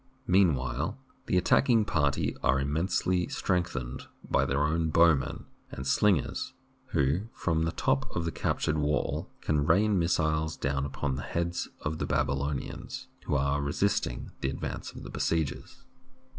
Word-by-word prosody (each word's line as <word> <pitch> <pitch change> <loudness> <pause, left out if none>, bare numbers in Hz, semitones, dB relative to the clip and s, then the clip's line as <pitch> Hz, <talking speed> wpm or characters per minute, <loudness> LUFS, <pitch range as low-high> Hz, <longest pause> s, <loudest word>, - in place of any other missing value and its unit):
Mean 90 -4 +5
while 65 - -3 0.3
the 90 - +2
attacking 115 +5 +4
party 70 -6 +1
are 65 - +3
immensely 85 +5 0
strength 90 -2 0
ened 60 0 -5 0.2
by 70 - +2
their 70 +2 +1
own 80 +2 +1
bowmen 80 -4 +3 0.2
and 65 - -6
slingers, 95 0 +1 0.3
who, 75 +10 +1
from 80 -2 0
the 80 - 0
top 70 - 0
of 85 - -1
the 85 - -1
captured 75 -1 0
wall, 75 0 0
can 75 -2 +1
rain 100 +3 +4
missiles 80 -2 +1
down 70 0 -1
upon 70 -1 -2
the - - -4
heads 85 +2 -2
of 80 +1 -3
the - - -1
Babylonians 70 0 -2 0.2
who - - 0
are 70 +1 +1
resist 75 +8 +1
ing - - -7
the 65 - 0
advance - - -5
of - - -10
the - - -8
besiegers. 80 -4 -2
75 Hz, 155 wpm, -29 LUFS, 70-85 Hz, 0.3 s, Mean